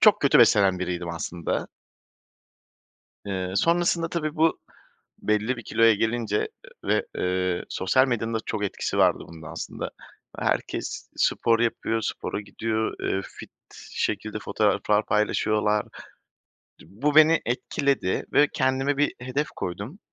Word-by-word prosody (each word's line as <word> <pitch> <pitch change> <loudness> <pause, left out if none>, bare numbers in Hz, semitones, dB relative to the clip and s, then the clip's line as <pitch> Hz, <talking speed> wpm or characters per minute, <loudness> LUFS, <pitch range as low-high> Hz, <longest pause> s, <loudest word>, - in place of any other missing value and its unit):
çok 210 -1 +6
kötü 140 - +5
beslenen 100 -5 +5
biriydim 90 -1 -3
aslında. 85 0 -3 1.6
Eee, 95 -2 -3
sonrasında 170 - +2
tabii, 155 -2 -2
bu 160 +1 +2 0.6
belli 105 +4 0
bir 120 - -8
kiloya 115 +1 +4
gelince, 110 -1 0
eee, - - -1 0.4
ve, - - +1
eee, 90 -1 0
sosyal 130 +8 +2
medyanın 115 -2 -1
da - - +1
çok 105 -2 -2
etkisi 100 - -3
vardı - - +3
bunun 80 -1 -11
aslında. 75 - -6 0.5
Herkes - - -2
spor 115 -1 +2
yapıyor, 115 -1 0
spora 105 0 -3
gidiyor, 110 +2 -2
eee, 95 - 0
fit - - -12 0.4
şekilde - - -2
fotoğraflar 105 0 +1
paylaşıyorlar. 105 0 +1 1.0
Di - - -15
bu 135 - -1
beni 155 +1 +7
etkiledi 125 -3 0
ve 145 - +6
kendime 135 +2 +1
bir 145 +1 +2
hedef 130 +4 -2
koydum. 100 - -5
110 Hz, 130 wpm, -25 LUFS, 100-140 Hz, 1.6 s, beni